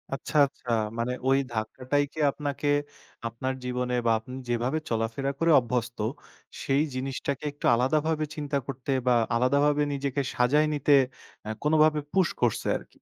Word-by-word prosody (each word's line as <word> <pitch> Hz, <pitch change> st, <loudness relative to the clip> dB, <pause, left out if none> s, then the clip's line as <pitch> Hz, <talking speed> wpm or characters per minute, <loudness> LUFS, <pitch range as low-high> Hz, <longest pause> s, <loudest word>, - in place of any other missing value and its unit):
আচ্ছা, 150 Hz, -, -4 dB
আচ্ছা 135 Hz, -, -13 dB, 0.3 s
মানে 125 Hz, +2 st, 0 dB
ওই 135 Hz, 0 st, +5 dB
ধাক্কাটাইকে 130 Hz, +7 st, -2 dB
আপনাকে 145 Hz, 0 st, -3 dB, 0.6 s
আপনার 130 Hz, +3 st, -3 dB
জীবনে 125 Hz, 0 st, -2 dB
বা 115 Hz, -, +4 dB
আপনি 125 Hz, +3 st, -11 dB, 0.2 s
যেভাবে 120 Hz, +5 st, 0 dB
চলাফেরা 115 Hz, +4 st, -1 dB
করে 165 Hz, 0 st, +3 dB
অভ্যস্ত, 120 Hz, -1 st, -3 dB, 0.7 s
সেই 140 Hz, +2 st, +2 dB
জিনিসটাকে 135 Hz, +2 st, -3 dB
একটু 145 Hz, -, -8 dB
আলাদাভাবে 155 Hz, +5 st, +1 dB
চিন্তা 145 Hz, -2 st, -2 dB
করতে 135 Hz, 0 st, -4 dB, 0.2 s
বা 125 Hz, -, +5 dB, 0.2 s
আলাদাভাবে 140 Hz, +4 st, +3 dB
নিজেকে 140 Hz, 0 st, -1 dB
সাজায় 145 Hz, +5 st, +3 dB
নিতে, 145 Hz, 0 st, +3 dB, 0.5 s
আ -, -, -3 dB
কোনোভাবে 155 Hz, 0 st, +4 dB
পুশ 190 Hz, -3 st, +4 dB
করছে 120 Hz, -3 st, +1 dB
আরকি। -, -, -16 dB
135 Hz, 140 wpm, -27 LUFS, 125-150 Hz, 0.7 s, ওই